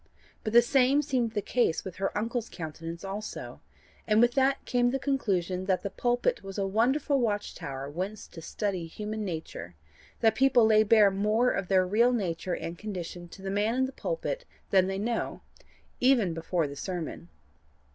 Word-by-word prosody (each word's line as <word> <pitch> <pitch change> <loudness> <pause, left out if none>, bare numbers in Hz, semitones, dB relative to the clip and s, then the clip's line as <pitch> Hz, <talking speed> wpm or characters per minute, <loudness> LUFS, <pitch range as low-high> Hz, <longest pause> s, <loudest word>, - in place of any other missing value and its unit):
But 215 - -3
the 235 0 +8
same 270 +3 +3
seemed 250 -6 0
the 205 -2 -1
case 235 -7 +1
with 185 -2 -7
her 195 +1 -2
uncle's 230 +2 -2
countenance 165 +1 -7
also; 200 +2 -6 0.5
and 215 0 +4
with 240 +1 +5
that 270 +1 +2
came 245 0 +2
the 265 - 0
conclusion 195 -10 -1
that 185 -1 0
the 200 - -3
pulpit 245 - 0
was 195 0 -8
a 200 - 0
wonderful 265 +8 +2
watch 210 -4 -1
tower 135 0 -6
whence 185 +8 -5
to 165 - -10
study 185 0 -3
human 215 +5 -5
nature; 160 - -6 0.5
that 225 -2 +5
people 250 -1 +4
lay 215 -1 +5
bare 215 -1 +5
more 215 +5 +2
of 195 -2 -2
their 185 -1 +3
real 230 +6 +3
nature 180 -5 -2
and 170 +1 -6
condition 180 -4 -6
to 190 +3 -13
the 195 - -3
man 210 +4 +1
in 260 +1 +2
the 260 - -5
pulpit - - -3 0.3
than 190 -1 +5
they 195 0 -2
know 230 +4 -2 0.6
even 245 -9 +3
before 165 0 -1
the 140 - -8
sermon. 165 - -5
210 Hz, 180 wpm, -28 LUFS, 185-240 Hz, 0.6 s, the